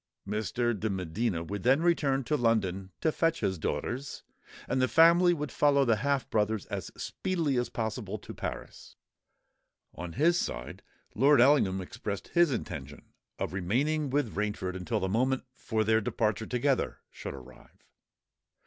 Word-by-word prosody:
Mr. 110 +3 0
de 110 +1 -2
Medina 95 0 -2
would 100 +4 -5
then 135 - +3
return 140 -6 +2
to 140 +5 0
London 100 -7 0
to 160 - +2
fetch 165 +1 0
his 95 -3 -1
daughters; 120 - -3 0.4
and 130 - 0
the 130 - +3
family 170 +7 +6
would 150 -4 -2
follow 140 -2 +3
the 115 -3 +3
half 140 +3 0
brothers 105 -1 0
as - - -4
speedily 165 -7 -1
as 125 0 0
possible 110 -2 -3
to - - -10
Paris. - - -7 1.0
On 90 -1 -7
his 170 +5 +3
side, - - -4 0.3
Lord 140 +4 +5
Ellingham 120 -8 +4
expressed 100 +2 -6
his 175 -2 +4
intention 75 - -6 0.2
of - - -3
remaining 135 - 0
with 135 -4 0
Rainford 105 -3 -2
until 90 -3 -2
the 95 - -1
moment 130 +6 +1
for 110 -3 -1
their 110 +1 +3
departure 110 +1 -1
together 130 +2 0
should - - -7
arrive. 65 -1 -15
115 Hz, 150 wpm, -29 LUFS, 100-140 Hz, 1.0 s, family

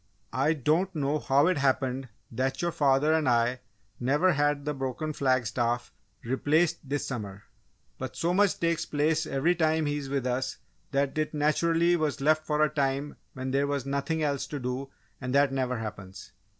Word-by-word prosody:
"I 135 +6 +2
don't 160 +6 +1
know 145 0 0
how 140 +1 +3
it 180 -3 +2
happened 130 -1 0 0.2
that 130 +3 -1
your 175 0 0
father 145 +1 +3
and 155 -4 +2
I 120 +1 +2 0.4
never 145 +9 +3
had 145 -1 +1
the 150 - -1
broken 135 +3 -3
flag 130 -3 +1
staff 120 +2 -1 0.3
replaced 155 +7 +1
this 145 0 -1
summer, 105 -5 -6 0.6
but 130 0 -5
so 170 +7 0
much 200 +1 +3
takes 170 -1 +1
place 155 +2 0
every 145 +6 +2
time 160 -2 +1
he 145 0 0
is 140 -2 -5
with 135 -2 -1
us, 125 +1 -1 0.3
that 140 -1 0
it 155 0 -1
naturally 165 +3 +2
was 155 -4 -1
left 155 +2 +2
for 150 0 +2
a 155 - +3
time 140 0 -1 0.2
when 130 0 -4
there 140 +1 +1
was 140 -2 -2
nothing 140 +3 -1
else 140 -2 -1
to 145 - -5
do 125 +2 -4 0.3
and 130 0 -2
that 140 -1 +4
never 130 -2 -1
happens!" 100 -3 -8
140 Hz, 180 wpm, -28 LUFS, 130-155 Hz, 0.6 s, that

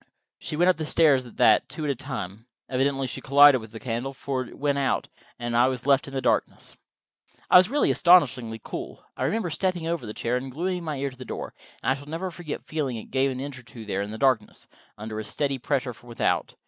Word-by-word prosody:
She - - -5
went 175 +3 +3
up 185 - +4
the 155 - -3
stairs 140 -7 +4
at 120 - -15
that, - - +4
two 155 - -6
at 145 - +1
a - - -2
time. 115 -4 -6 0.2
Evidently 135 +1 0
she 120 - -6
collided 140 -1 +7
with 110 - -10
the 110 - -8
candle, 125 +3 -3
for 135 0 -3
it - - -13
went 140 -1 0
out, 135 - 0 0.3
and 120 0 -3
I 120 +2 +5
was 130 -1 -3
left 140 0 +3
in 135 -1 -3
darkness. 125 - -1 0.8
I - - +10
was 185 +2 +5
really 290 +3 +2
astonishingly 130 - +4
cool. - - -7
I - - -2
remember 215 -6 -1
stepping 180 0 -1
over 165 -8 -2
the 105 - -7
chair 120 +2 -1
and 130 +1 -5
gluing 180 +5 -2
my 155 -3 -3
ear 140 0 -2
to 130 - -15
the 130 - -8
door, - - -6 0.3
and 125 - +2
I - - +5
shall 140 +1 -9
never 175 +4 -3
forget 165 -3 -7
feeling 140 -6 -2
it 110 - -10
give 135 +1 +2
an 130 - -5
inch 135 -1 -6
or - - -15
two 115 -1 -11
there 100 -1 -2
in 100 - -4
the 110 - -6
darkness, 115 -4 +1 0.3
under 110 0 -5
a - - -4
steady 135 +5 -2
pressure 135 -1 -1
from 120 +2 -17
without. 115 - -1
135 Hz, 240 wpm, -26 LUFS, 120-150 Hz, 0.8 s, I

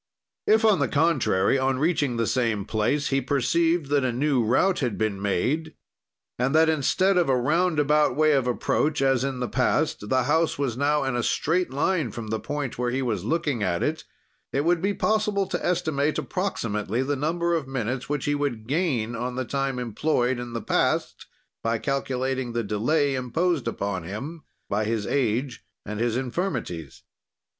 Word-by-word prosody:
"If, 220 +1 +4
on 215 -6 +4
the 140 - +2
contrary, 135 - +2
on 130 0 +1
reaching 145 -4 +1
the 115 - +1
same 115 -5 0
place 110 +7 0
he 135 0 +1
perceived 160 +3 +1
that 145 -2 +3
a 130 - +1
new 130 0 +1
route 155 - +2
had 125 -6 -1
been 105 -3 -1
made, 135 - -1 0.6
and 130 +4 +1
that 160 0 +5
instead 180 +6 +2
of 170 - +1
a 130 - +3
roundabout 150 0 +2
way 155 +1 +4
of 135 -4 +2
approach, 145 +4 0
as 135 -2 +2
in 135 -2 -3
the 125 - 0
past, 105 - 0
the 130 -1 +2
house 160 +5 +1
was 135 -5 -1
now 145 +2 +1
in 135 -2 -1
a 120 - +1
straight 170 +9 0
line 150 +1 0
from 115 -2 -7
the 110 0 -1
point 145 -3 -4
where 125 0 0
he 130 +2 -1
was 110 -7 -1
looking 150 -2 -1
at 85 -3 0
it, - - -1 0.5
it 140 +2 0
would 170 -1 +2
be 200 +1 0
possible 215 -2 +1
to - - -4
estimate 155 -4 0
approximately 115 - -2
the 145 +2 -1
number 170 +4 0
of 160 -5 -1
minutes 125 0 -3
which 145 -2 -1
he 145 0 +1
could 135 -7 -2
gain 130 -7 0
on 125 +2 -3
the 130 0 -2
time 135 +1 -2
employed 125 +1 0
in 120 -1 -6
the 115 - -4
past, - - 0 0.3
by 115 0 0
calculating 130 -1 -2
the 120 0 -1
delay 135 +8 +1
imposed 135 +4 0
upon 100 -4 -2
him 115 - -6 0.3
by 105 +2 0
his 110 -1 -1
age 125 -1 -1 0.2
and 105 +1 -5
his 120 0 0
infirmities. 125 - -4
135 Hz, 180 wpm, -25 LUFS, 120-155 Hz, 0.6 s, that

